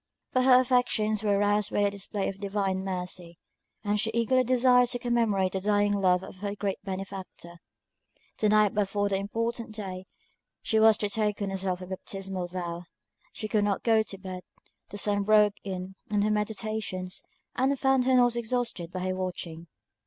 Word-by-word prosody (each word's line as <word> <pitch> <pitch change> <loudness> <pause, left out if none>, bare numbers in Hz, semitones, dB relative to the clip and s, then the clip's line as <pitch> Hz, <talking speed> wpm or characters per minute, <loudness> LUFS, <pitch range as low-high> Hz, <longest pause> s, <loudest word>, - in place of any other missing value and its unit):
But 255 0 +3
her 255 -1 +8
affections 245 -4 +1
were 205 -2 +2
roused 205 0 +1
by 205 - +2
the 200 - +2
display 200 0 -3
of 195 - -5
divine 195 -2 -1
mercy; 180 -2 -5 0.5
and 210 0 0
she 220 - 0
eagerly 255 +2 +3
desired 250 0 +4
to 245 - -1
commemorate 230 -6 +1
the 190 - -3
dying 205 0 +2
love 185 -2 +2
of - - -10
her 200 +1 -4
great 200 -2 -3
benefactor. 190 -2 -7 0.8
The 215 - +3
night 210 -1 +4
before 205 0 0
the 195 - +1
important 225 +2 -3
day, 195 -4 -5
when 185 - -11 0.6
she 220 - +2
was 220 -1 +6
to 205 - -1
take 210 -1 0
on 195 - -2
herself 190 -1 -2
her - - -6
baptismal 190 0 -5
vow, 175 -1 -5 0.5
she 215 - -4
could 215 -1 +1
not 205 -1 0
go 225 -2 +4
to 205 -2 -6
bed; 185 -1 -7 0.5
the 205 - -7
sun 205 0 0
broke 210 0 +4
in 185 -1 -5 0.2
on 205 -1 +1
her 215 - +2
meditations, 210 -3 -2 0.3
and 270 +2 +2
found 265 -1 +2
her 260 0 +4
not 245 -1 +4
exhausted 235 -7 -2
by 185 - -4
her 185 0 -1
watching. 175 -3 -5
205 Hz, 180 wpm, -28 LUFS, 190-220 Hz, 0.8 s, her